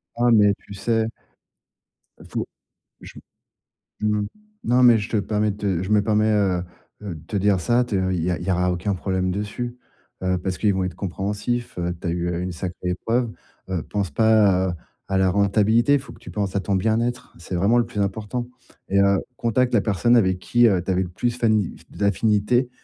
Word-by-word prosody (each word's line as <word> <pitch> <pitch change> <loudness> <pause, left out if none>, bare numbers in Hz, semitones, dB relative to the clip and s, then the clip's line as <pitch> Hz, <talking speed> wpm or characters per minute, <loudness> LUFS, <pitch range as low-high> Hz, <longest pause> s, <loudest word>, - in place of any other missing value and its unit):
Ah, 120 +1 +2
mais 105 -2 +5
tu 100 - -11
sais 110 +2 0 1.1
il - - -14
faut - - -3 0.6
je - - -11 0.8
mmh, 105 -1 0 0.4
non 125 +2 +3
mais 120 -2 +7
je 105 +1 -5
te - - 0
permets 105 +1 0
te 100 -4 -2
je 95 - -5
me 105 -1 +4
permets, 110 +1 +2
heu 95 -4 +1 0.4
heu, 100 -4 -5
de 80 - -11
te 105 - -4
dire 100 -1 +2
ça, 120 +7 +2
te 95 -5 -1
il 90 -3 -1
y 90 - 0
a 90 - -1
il - - -7
y 95 - -1
a 90 0 +2
aucun 90 +3 -1
problème 95 0 -1
dessus, 105 +5 -4 0.5
heu 95 0 +1
parce 90 +1 -3
qu'ils 105 -2 +2
vont 95 0 0
être 90 -2 -4
compréhensifs, 105 +5 -3
heu, 90 0 -1
tu - - -6
as - - +1
eu 85 0 -2
une 90 0 -3
sacrée 90 +1 -4
épreuve, 115 +6 -1 0.4
heu, 90 -4 -2
pense 100 0 -3
pas, 100 -1 +4
heu, - - -4 0.3
à 95 -1 +1
la 95 -1 +3
rentabilité. 105 +6 +3
Il 145 - +2
faut 130 -3 -12
que - - -17
tu - - -10
penses 100 -2 -2
à - - +2
ton 100 +1 -1
bien-être. 115 +5 -1
C'est 85 +2 -7
vraiment 100 +7 +3
le 120 - +3
plus 115 -3 -4
important 105 +4 -2 0.4
et 100 0 +3
heu, 100 0 +4 0.2
contacte 120 +2 +1
la 115 - +5
personne 115 +3 +2
avec 95 -5 +3
qui, 120 +6 +3
heu, 95 -4 +2
tu 95 - -4
avais 95 0 +2
le 90 - -4
plus 120 +7 -2
fani 110 -6 +1 0.2
d'affinité 105 +4 +1
100 Hz, 210 wpm, -23 LUFS, 95-115 Hz, 1.1 s, mais